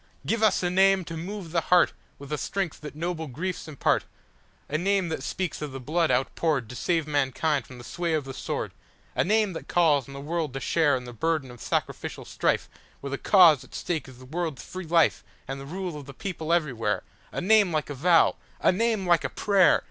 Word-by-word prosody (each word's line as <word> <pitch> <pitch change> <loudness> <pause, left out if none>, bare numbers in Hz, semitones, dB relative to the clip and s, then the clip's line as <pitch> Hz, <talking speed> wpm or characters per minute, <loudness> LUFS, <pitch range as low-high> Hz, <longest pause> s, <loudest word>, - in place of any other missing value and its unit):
Give 225 0 0
us 215 -4 +3
a 175 - +1
name 190 0 +4
to 165 - -6
move 180 +1 -6
the 165 -1 +2
heartWith 180 0 +4 0.4
the 150 - -1
strength 195 -6 -3
that 150 -1 -8
noble 160 0 -3
griefs 175 +8 -4
impart,A 150 0 -4
name 195 -1 +1
that 160 - -3
speaks 185 -5 -3
of 150 -3 -5
the 135 - -5
blood 160 +5 +1
outpouredTo 135 -3 0
save 165 +3 0
mankind 145 -1 0
from 130 - -11
the 120 - -10
sway 170 +5 -2
of 155 - -1
the 135 - -6
sword,—A - - -4
name 210 0 +2
that 160 - -7
calls 150 -7 +3
on 140 - -10
the - - -6
world 155 -1 -3
to - - -2
shareIn 140 -3 +2
the 120 - -8
burden 145 +2 -1
of 125 - -13
sacrificial - - -3
strifeWhere - - 0 0.4
the 140 - -3
cause 170 - +6
at - - -14
stake 160 -6 -2
is 130 -2 -13
the 130 - -13
world's 160 0 -3
free 185 -2 -7
lifeAnd 165 -2 +3 0.4
the 135 - -8
rule 180 +1 -4
of 145 -2 -9
the 140 - -10
people 165 -4 -4
everywhere,—A 130 -11 -2
name 205 0 +4
like 155 -2 -1
a - - -2
vow, 165 +5 +4 0.2
a - - +4
name 220 0 0
like 175 -2 +4
a - - -1
prayer. 200 -3 +4
165 Hz, 200 wpm, -26 LUFS, 140-180 Hz, 0.4 s, cause